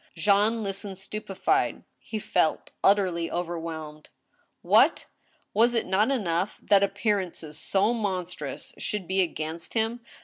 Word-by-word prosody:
Jean 205 Hz, +6 st, +3 dB
listened 195 Hz, -1 st, -5 dB
stupefied. 195 Hz, 0 st, -1 dB, 0.2 s
He 220 Hz, -, -5 dB
felt 180 Hz, -6 st, 0 dB
utterly 185 Hz, -4 st, +3 dB
overwhelmed. 165 Hz, -3 st, -5 dB, 0.5 s
What! -, -, +4 dB, 0.5 s
was 235 Hz, +3 st, +4 dB
it 230 Hz, -, +1 dB
not 195 Hz, +6 st, +2 dB
enough 190 Hz, -7 st, 0 dB
that 200 Hz, -1 st, +5 dB
appearances 195 Hz, -6 st, -1 dB
so 200 Hz, +7 st, +2 dB
monstrous 180 Hz, -, -4 dB
should 205 Hz, -4 st, -3 dB
be 190 Hz, 0 st, +2 dB
against 165 Hz, 0 st, -4 dB
him 225 Hz, +2 st, 0 dB
195 Hz, 115 wpm, -27 LUFS, 170-210 Hz, 0.5 s, that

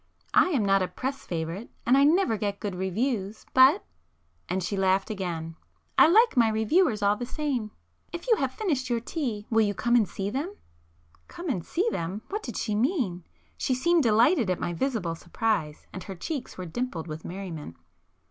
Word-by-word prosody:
I -, -, +6 dB
am 265 Hz, -, +1 dB
not 195 Hz, 0 st, +4 dB
a 185 Hz, -, +1 dB
press 270 Hz, +6 st, -5 dB
favourite—and 175 Hz, +9 st, -2 dB
I 275 Hz, -, +5 dB
never 315 Hz, -, +4 dB
get 200 Hz, -1 st, -2 dB
good 205 Hz, -2 st, -3 dB
reviews,—but—" 215 Hz, +6 st, +2 dB, 0.6 s
and 185 Hz, +1 st, -1 dB
she 190 Hz, +4 st, -2 dB
laughed 190 Hz, +2 st, +1 dB
again—"I 170 Hz, -, -1 dB
like 445 Hz, +6 st, +5 dB
my 230 Hz, -3 st, +5 dB
reviewers 220 Hz, -, +2 dB
all 200 Hz, +1 st, +4 dB
the 245 Hz, -, -4 dB
same! 265 Hz, -7 st, -2 dB, 0.4 s
If 345 Hz, +6 st, -7 dB
you 455 Hz, -3 st, +4 dB
have 270 Hz, -6 st, 0 dB
finished 275 Hz, -, -2 dB
your 240 Hz, -1 st, +1 dB
tea, 230 Hz, -5 st, -4 dB
will 225 Hz, 0 st, +4 dB
you 205 Hz, -2 st, +1 dB
come 240 Hz, +1 st, +1 dB
and 215 Hz, -7 st, +3 dB
see 195 Hz, +3 st, -3 dB
them?" 305 Hz, -, -3 dB, 0.7 s
[p -, -, -17 dB
230]Come 350 Hz, -1 st, -5 dB
and 180 Hz, -9 st, -2 dB
see 370 Hz, -, -1 dB
them! 185 Hz, +6 st, -4 dB
What 420 Hz, +2 st, -3 dB
did 240 Hz, -, -6 dB
she 215 Hz, -, -1 dB
mean? 215 Hz, -, 0 dB, 0.3 s
She 255 Hz, -, +1 dB
seemed 340 Hz, +6 st, +3 dB
delighted 235 Hz, -, +4 dB
at 180 Hz, -, 0 dB
my 175 Hz, -, -2 dB
visible 210 Hz, -4 st, -1 dB
surprise, 170 Hz, -2 st, -2 dB
and 185 Hz, -, -6 dB
her 195 Hz, -, -6 dB
cheeks 280 Hz, -, -5 dB, 0.2 s
dimpled 215 Hz, -6 st, -3 dB
with 155 Hz, 0 st, -7 dB
merriment. 170 Hz, -, -7 dB
220 Hz, 180 wpm, -27 LUFS, 190-270 Hz, 0.7 s, I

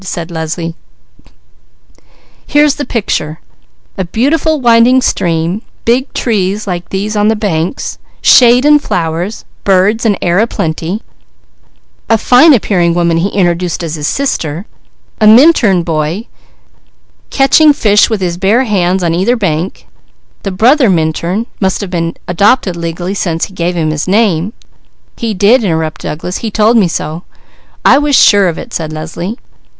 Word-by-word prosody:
said 175 Hz, -2 st, -6 dB
Leslie. 165 Hz, +1 st, -4 dB, 1.7 s
"Here's 295 Hz, 0 st, +3 dB
the 290 Hz, -, -3 dB
picture: 160 Hz, -8 st, -3 dB, 0.6 s
a -, -, 0 dB
beautiful 285 Hz, -, 0 dB
winding 240 Hz, +1 st, +4 dB
stream, 170 Hz, +3 st, -1 dB, 0.2 s
big 250 Hz, +4 st, +1 dB
trees 205 Hz, -3 st, -1 dB
like 175 Hz, -3 st, -5 dB
these 205 Hz, +3 st, -3 dB
on 210 Hz, 0 st, +1 dB
the 220 Hz, -, +2 dB
banks, 185 Hz, -, -3 dB, 0.2 s
shade 245 Hz, +1 st, +5 dB
and 295 Hz, 0 st, +5 dB
flowers, 175 Hz, -, -3 dB, 0.2 s
birds, 200 Hz, +3 st, +2 dB
and 210 Hz, -4 st, +1 dB
air 175 Hz, +1 st, +1 dB
a 225 Hz, -, +2 dB
plenty, 165 Hz, +3 st, -4 dB, 1.1 s
a 225 Hz, -, +4 dB
fine 250 Hz, +8 st, +5 dB
appearing 180 Hz, -9 st, +1 dB
woman 170 Hz, -1 st, +1 dB
he 180 Hz, +4 st, 0 dB
introduced 175 Hz, -3 st, -1 dB
as 160 Hz, -2 st, -4 dB
his 150 Hz, -2 st, -3 dB
sister, 175 Hz, -, -2 dB, 0.5 s
a 215 Hz, -, +4 dB
Minturn 220 Hz, -, +5 dB
boy 165 Hz, +5 st, -2 dB, 1.0 s
catching 295 Hz, +3 st, +4 dB
fish 210 Hz, -7 st, +3 dB
with 220 Hz, -4 st, -2 dB
his 175 Hz, -1 st, -3 dB
bare 215 Hz, +7 st, +2 dB
hands 190 Hz, -5 st, 0 dB
on 165 Hz, -1 st, 0 dB
either 190 Hz, +8 st, +1 dB
bank, 180 Hz, -4 st, -3 dB, 0.6 s
the 195 Hz, -, -4 dB
brother 245 Hz, +6 st, +3 dB
Minturn 170 Hz, +5 st, -1 dB
must 190 Hz, -2 st, 0 dB
have 190 Hz, -2 st, -7 dB, 0.3 s
adopted 195 Hz, +1 st, +1 dB
legally, 170 Hz, +2 st, -4 dB
since 170 Hz, -5 st, -2 dB
he 195 Hz, -, -15 dB
gave 175 Hz, -1 st, -2 dB
him 160 Hz, -2 st, -1 dB
his 155 Hz, +2 st, -3 dB
name 195 Hz, -2 st, +1 dB, 0.3 s
" -, -, -40 dB
"He 225 Hz, -3 st, -2 dB
did," 215 Hz, +6 st, +3 dB
interrupted 160 Hz, -4 st, -2 dB
Douglas. 175 Hz, +4 st, -5 dB
"He 225 Hz, -, -4 dB
told 215 Hz, +2 st, +2 dB
me 210 Hz, -6 st, +4 dB
so 160 Hz, 0 st, -4 dB, 0.3 s
" -, -, -34 dB
"I 275 Hz, -, +6 dB
was 295 Hz, -1 st, +1 dB
sure 200 Hz, -5 st, +5 dB
of 170 Hz, -, -3 dB
it," -, -, -9 dB
said 155 Hz, -2 st, -4 dB
Leslie. 165 Hz, +7 st, -6 dB
190 Hz, 150 wpm, -12 LUFS, 170-230 Hz, 1.7 s, I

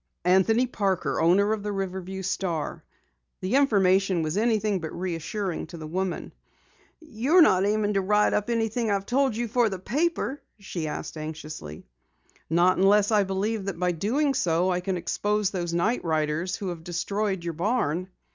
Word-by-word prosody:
"Anthony 190 Hz, +7 st, +4 dB
Parker, 195 Hz, -9 st, -1 dB
owner 195 Hz, +6 st, +4 dB
of 220 Hz, -, -3 dB
the 210 Hz, 0 st, -3 dB
Riverview 190 Hz, -1 st, -4 dB
Star." 180 Hz, -4 st, -3 dB, 0.6 s
The 185 Hz, +4 st, -3 dB
information 195 Hz, -9 st, +3 dB
was 155 Hz, +2 st, -2 dB
anything 215 Hz, -2 st, +1 dB
but 160 Hz, -2 st, -5 dB
reassuring 180 Hz, +1 st, -3 dB
to 170 Hz, -, -9 dB
the 160 Hz, -, -7 dB
woman. 185 Hz, +3 st, -3 dB, 0.7 s
"You're 310 Hz, +3 st, +3 dB
not 190 Hz, -7 st, +4 dB
aiming 210 Hz, 0 st, +1 dB
to 195 Hz, -, +2 dB
write 210 Hz, +2 st, +2 dB
up 210 Hz, +2 st, 0 dB
anything 230 Hz, 0 st, 0 dB
I've 200 Hz, -1 st, 0 dB
told 265 Hz, 0 st, +1 dB
you 235 Hz, +1 st, -2 dB
for 235 Hz, 0 st, +2 dB
the 190 Hz, -, -4 dB
paper?" 285 Hz, -, -1 dB, 0.2 s
she 185 Hz, -5 st, -5 dB
asked 150 Hz, -, -5 dB
anxiously. 155 Hz, -, -7 dB, 0.6 s
"Not 175 Hz, +3 st, +3 dB
unless 205 Hz, +2 st, +4 dB
I 210 Hz, -2 st, +4 dB
believe 195 Hz, +2 st, -2 dB
that 195 Hz, -4 st, -4 dB
by 180 Hz, 0 st, +1 dB
doing 250 Hz, -, 0 dB
so 175 Hz, -4 st, +1 dB
I 180 Hz, -, 0 dB
can 185 Hz, 0 st, -2 dB
expose 205 Hz, +3 st, 0 dB
these 175 Hz, -3 st, -3 dB
night 175 Hz, +8 st, 0 dB
riders 160 Hz, +2 st, -1 dB
who 200 Hz, -4 st, -4 dB
have 170 Hz, -2 st, -6 dB
destroyed 190 Hz, +2 st, -2 dB
your 170 Hz, -1 st, -3 dB
barn." 180 Hz, -2 st, 0 dB
195 Hz, 165 wpm, -26 LUFS, 175-215 Hz, 0.7 s, Anthony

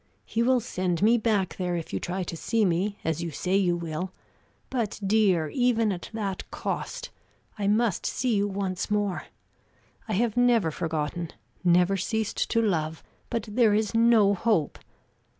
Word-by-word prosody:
He 225 Hz, -, -1 dB
will 255 Hz, +1 st, +4 dB
send 185 Hz, -5 st, -2 dB
me 230 Hz, +3 st, +5 dB
back 210 Hz, -4 st, 0 dB
there 180 Hz, -2 st, -1 dB
if 165 Hz, -2 st, -5 dB
you -, -, 0 dB
try 185 Hz, +2 st, -3 dB
to 170 Hz, -, -5 dB
see 220 Hz, +6 st, +1 dB
me, 190 Hz, +4 st, 0 dB
as 160 Hz, 0 st, 0 dB
you 170 Hz, -, -3 dB
say 180 Hz, +5 st, -1 dB
you 180 Hz, -3 st, +2 dB
will, 170 Hz, +2 st, -4 dB, 0.6 s
but 235 Hz, -6 st, -2 dB
dear, 195 Hz, -6 st, +3 dB
even 235 Hz, -, +2 dB
at 180 Hz, -2 st, -5 dB
that 205 Hz, -4 st, -4 dB
cost -, -, -4 dB, 0.5 s
I 200 Hz, -, 0 dB
must 215 Hz, -1 st, +1 dB
see 250 Hz, -2 st, 0 dB
you 200 Hz, 0 st, +2 dB
once 195 Hz, -2 st, -3 dB
more. 205 Hz, -3 st, 0 dB, 0.8 s
I 220 Hz, -, -2 dB
have 220 Hz, +2 st, +1 dB
never 240 Hz, -8 st, +3 dB
forgotten, 160 Hz, +1 st, -3 dB, 0.3 s
never 180 Hz, +2 st, +4 dB
ceased 220 Hz, +3 st, -1 dB
to 230 Hz, -1 st, +2 dB
love; 160 Hz, -6 st, -1 dB, 0.3 s
but 230 Hz, -2 st, -2 dB
there 215 Hz, -1 st, +3 dB
is 215 Hz, 0 st, 0 dB
no 225 Hz, -3 st, +5 dB
hope! 190 Hz, -6 st, 0 dB
200 Hz, 165 wpm, -27 LUFS, 175-225 Hz, 0.8 s, me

